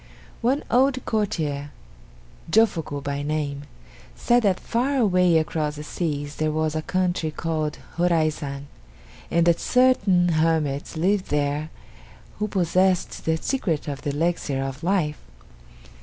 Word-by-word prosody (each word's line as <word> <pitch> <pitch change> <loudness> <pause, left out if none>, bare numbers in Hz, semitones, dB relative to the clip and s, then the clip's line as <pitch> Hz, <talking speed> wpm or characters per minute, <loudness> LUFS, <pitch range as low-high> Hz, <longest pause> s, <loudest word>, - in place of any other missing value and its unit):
One 260 +5 +1
old 260 +1 +3
courtier, 155 -10 -1 0.8
Jofuku 165 -8 +2
by 140 0 -2
name, 145 -1 -3 0.5
said 240 0 +3
that 195 -4 +2
far 255 +5 -1
away 180 -7 +4
across 155 -1 -1
the 150 - -7
seas 145 -3 -3
there 155 0 0
was 155 0 0
a 155 - -1
country 180 -2 0
called 155 -1 -2 0.2
Horaizan, 155 -5 0 0.6
and 170 0 +2
that 170 -1 +3
certain 205 -9 +3
hermits 155 -2 0
lived 190 +4 +1
there 145 +1 -1 0.7
who 210 - 0
possessed 185 -1 +1
the 160 0 +2
secret 170 - -2
of 140 -1 -4
the - - -3
Elixir 145 -2 -1
of 135 +1 -5
Life. 170 -4 0
160 Hz, 125 wpm, -24 LUFS, 150-185 Hz, 0.8 s, away